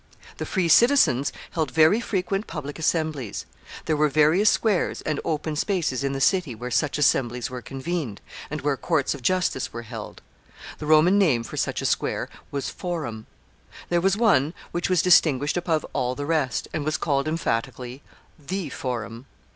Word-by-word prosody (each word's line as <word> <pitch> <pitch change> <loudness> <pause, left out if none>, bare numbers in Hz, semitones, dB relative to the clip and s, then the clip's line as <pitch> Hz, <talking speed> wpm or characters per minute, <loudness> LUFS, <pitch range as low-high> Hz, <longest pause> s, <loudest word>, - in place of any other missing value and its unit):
The - - -4
free 185 -4 0
citizens 165 - +5 0.2
held 160 -4 -1
very 160 - +4
frequent 195 -1 -2
public 150 -2 -6
assemblies. 155 - -1 0.4
There 155 - +1
were 150 0 +3
various 155 +8 +4
squares 210 -6 +1
and 155 -2 -1
open 155 -1 -2
spaces 160 - -1
in 140 - 0
the 135 - -3
city 170 - +2
where 125 +3 -6
such 150 +4 +1
assemblies 125 -4 +1
were 125 -1 -5
convened, 135 - -4 0.3
and 150 0 -4
where 145 -2 0
courts 155 0 0
of 140 - -9
justice 180 -1 0
were 115 0 -6
held. 115 -2 -9 0.6
The 150 - -5
Roman 160 +6 +5
name 140 -12 +3
for - - -8
such - - -1
a - - -2
square - - -1 0.2
was 140 -1 -3
forum. 150 -12 -5 0.6
There 175 0 +2
was 195 +2 +2
one 170 - +3 0.2
which 175 - -2
was 180 -2 +3
distinguished 150 -5 +4
above 170 -3 0
all 125 0 -1
the 145 - -4
rest, 150 -6 0
and 155 - -2
was 155 +1 0
called 140 -2 0
emphatically 125 -4 -2 0.4
The 175 +2 -4
Forum. 120 -1 -5
150 Hz, 170 wpm, -24 LUFS, 130-175 Hz, 0.6 s, citizens